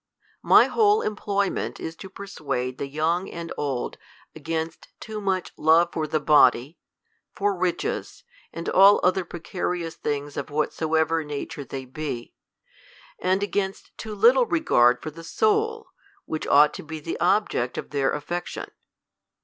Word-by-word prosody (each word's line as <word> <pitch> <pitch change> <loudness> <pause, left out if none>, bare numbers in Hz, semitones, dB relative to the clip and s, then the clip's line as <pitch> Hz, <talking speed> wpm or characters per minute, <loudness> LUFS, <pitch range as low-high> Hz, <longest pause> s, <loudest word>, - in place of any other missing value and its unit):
My - - +6
whole 425 -1 +3
employment 200 -2 -2
is 160 - -6
to 190 - -9
persuade 135 -10 -4
tlie 140 -1 -4
young 165 +5 0
and 170 0 -6
old 135 -4 -3 0.4
against 160 +1 -4
too 215 -1 -6
much 190 -2 -1
love 165 +2 +4
for 155 -1 -2
the 155 +1 0
body, 145 -1 +4 0.6
for 205 0 0
riches, 180 -1 -2 0.3
and 165 - -7
all 195 +2 +6
other 185 +1 +2
precarious 175 -1 -4
things 145 -1 -4
of - - -4
whatsoever 160 +2 0
nature 145 -1 -6
they 135 0 -7
be, 130 -2 -6 0.9
and 185 +2 +1
against 200 -1 -3
too 215 -2 -7
little 240 +4 +5
regard 125 - +3
for 155 - -5
the 165 +2 -11
soul, 440 - 0 0.4
which 155 - -4
ought 145 +1 +6
to - - -8
be 160 0 -7
the 165 +2 -5
object 180 - +1
of - - -6
their 140 -2 +1
affection. 175 +4 -5
165 Hz, 140 wpm, -25 LUFS, 150-195 Hz, 0.9 s, My